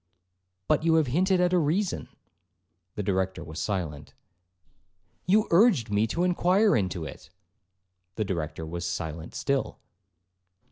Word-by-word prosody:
'But 155 -1 +3
you 165 -1 +3
have 160 -2 +4
hinted 180 +8 +2
at 180 0 +2
a 180 - +4
reason.' 170 +6 -1 0.9
The 105 - -3
Director 95 -1 -1
was 80 0 -8
silent. 80 -8 -4 1.1
'You 210 +4 +4
urged 170 - +4
me 105 +2 +2
to 170 +9 -1
inquire 180 +3 +3
into 90 -6 -1
it.' 70 - -10 0.9
The 110 - -1
Director 80 -4 -4
was 85 +2 -5
silent 85 -2 -5
still. 140 -1 -1
115 Hz, 130 wpm, -27 LUFS, -, 1.1 s, have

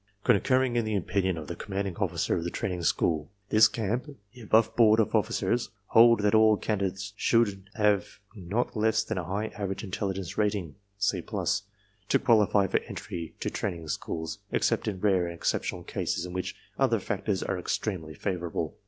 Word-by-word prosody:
*' 100 - -43
Concurring 130 +2 +3
in 120 - +2
the 110 -1 -1
opinion 95 -2 0
of 80 - -6
the - - -5
Commanding 100 -2 -3
Officer - - 0
of 85 - -2
the 85 - -2
Training 90 0 -3
School, 80 -2 +1 0.2
this 110 0 +7
camp, 120 +7 -3 0.2
the 125 - -13
above 110 +1 +3
board 110 -2 +6
of 110 - +1
officers 120 -2 +1 0.2
hold 115 -1 +6
that 105 0 +2
all 110 -1 +6
candidates 100 -2 -2
should 100 -4 +1
have 105 -3 +1 0.2
not 105 +7 -2
less 110 0 +2
than 110 -3 -3
a - - -3
high 100 +6 -2
average 100 0 -4
intelligence 95 -2 -3
rating 100 -7 0 0.2
(C+) 100 -2 0
to 100 +2 -2
qualify 105 -4 +4
for - - +1
entry 85 -2 -6
to - - -2
training 85 -5 -4
schools, 80 0 -4
except - - +1
in 100 -3 -2
rare 95 -4 +3
and 85 - -6
exceptional - - -2
cases - - -2
in 90 - -7
which 90 0 -3 0.2
other - - +3
factors 100 -4 -2
are 95 - -2
extremely 85 -4 -3
favorable. 85 -1 -3
100 Hz, 175 wpm, -28 LUFS, 90-110 Hz, 0.2 s, this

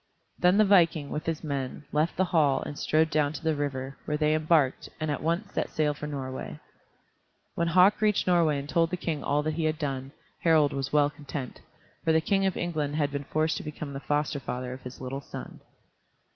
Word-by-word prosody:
Then 180 +2 +4
the 215 - +6
viking, 170 -7 +4
with 155 +2 -4
his 165 -1 -2
men, 140 -1 -4
left 155 +3 0
the 190 - +3
hall 155 -6 +2
and 145 - -6
strode 160 0 +2
down 150 -1 +2
to 155 - -7
the 160 -1 +2
river, 135 -2 -3
where 150 - -1
they 150 0 +2
embarked, 155 -3 +2
and 155 -1 -1
at 145 - -3
once 170 +6 -1
set - - -1
sail 150 -1 +1
for 150 +1 -6
Norway. 130 -3 -5 0.9
When 170 - 0
Hauk 185 +5 +5
reached 210 -2 +2
Norway 170 -5 +3
and 140 0 -5
told 165 +2 +2
the 180 - -2
King 160 -4 -3
all 145 +1 +1
that 155 0 -1
he 160 +1 -1
had 155 0 0
done, 135 -3 -3 0.3
Harald 155 -4 +4
was 135 -1 -3
well 145 -1 +3
content, 145 -3 -7 0.4
for 160 - +2
the 160 - +5
King 195 +4 +1
of 190 - -2
England 155 -4 -2
had 145 -2 +1
been 140 0 -4
forced 155 +2 0
to - - -6
become 150 -1 -6
the 135 - -4
foster 145 0 -1
father 125 -1 -4
of 130 - -9
his 125 0 -9
little 135 +2 -4
son. - - -9
150 Hz, 215 wpm, -28 LUFS, 140-165 Hz, 0.9 s, the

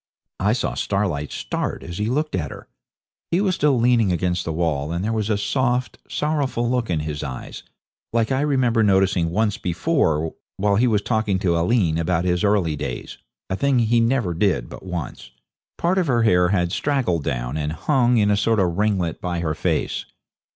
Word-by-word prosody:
I 105 +3 +2
saw 120 - -1
Starlight 90 -8 -1
start - - -3
as 85 +2 -7
he 105 - 0
looked 150 +6 -1
at 75 -6 -1
her. - - -10 0.6
He 170 - +2
was 195 -2 +1
still 145 -6 +2
leaning 115 -4 +3
against 90 0 -1
the 80 - -2
wall, 80 -3 -1
and 85 +3 -2
there 115 - 0
was 110 -1 -1
a 105 - +2
soft, 125 +3 -1
sorrowful 145 -6 -1
look 125 -1 0
in 80 -3 0
his 75 -1 -4
eyes, 65 -3 -7 0.5
like 115 +1 +1
I 130 +1 +1
remember 130 -6 +2
noticing 95 -4 +3
once 105 +3 0
before 85 - 0 0.2
while 100 +1 +2
he 125 +3 +3
was 105 -3 +1
talking 110 -3 0
to 85 -4 +2
Aileen 85 -2 +2
about 85 +1 0
his 90 -1 +1
early 100 -7 +2
days, 60 -3 -6 0.3
a 95 - -2
thing 140 +4 +1
he 120 0 +3
never 115 -6 +1
did 85 - 0
but - - -10
once. 90 -7 -6 0.5
Part 180 +3 +1
of 180 - 0
her 120 -4 +2
hair 90 -5 +4
had 90 -3 +1
straggled 120 - 0
down, - - -2
and 75 -1 -2
hung 125 - +2
in 105 -1 +3
a - - +4
sort 110 +1 +2
of 90 -1 0
ringlet 95 -6 0
by 90 -2 -2
her 80 -2 -1
face. - - -1
100 Hz, 195 wpm, -22 LUFS, 85-120 Hz, 0.6 s, hair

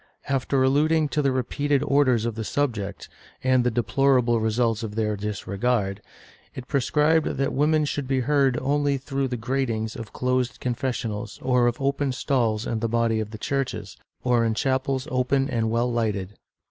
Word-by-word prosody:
After 135 -1 +1
alluding 150 +3 +3
to 150 - 0
the 140 -2 +2
repeated 140 +2 0
orders 135 -5 +3
on 115 - -1
the 110 +1 -4
subject, 110 -7 -2 0.4
and 130 -1 +3
the 125 - +2
deplorable 120 +1 +2
results 110 0 +1
of 105 -2 -5
their 105 -1 0
disregard, 100 +1 -2 0.5
it 125 -1 -7
prescribed 150 +3 +2
that 135 +1 0
women 150 +2 +2
should 145 -2 -3
be 130 -1 +1
heard 135 -1 +2
only 145 0 +1
through 135 0 -2
the 125 -1 -3
gratings 115 -2 -2
of 115 - -8
closed 125 -1 -1
confessionals, 120 -4 -3
or 125 -2 +3
of 120 0 -1
open 140 0 0
stalls 115 -5 0
in 115 - -2
the 115 0 -1
body 115 -1 +1
of 110 -1 -3
the 110 - -8
churches, 120 -5 -3 0.3
or 120 -2 +3
in 115 -1 0
chapels 130 +2 0
open 130 +2 +1
and 115 -4 0
well 120 +2 +1
lighted. 105 -4 -1
125 Hz, 170 wpm, -25 LUFS, 115-135 Hz, 0.5 s, alluding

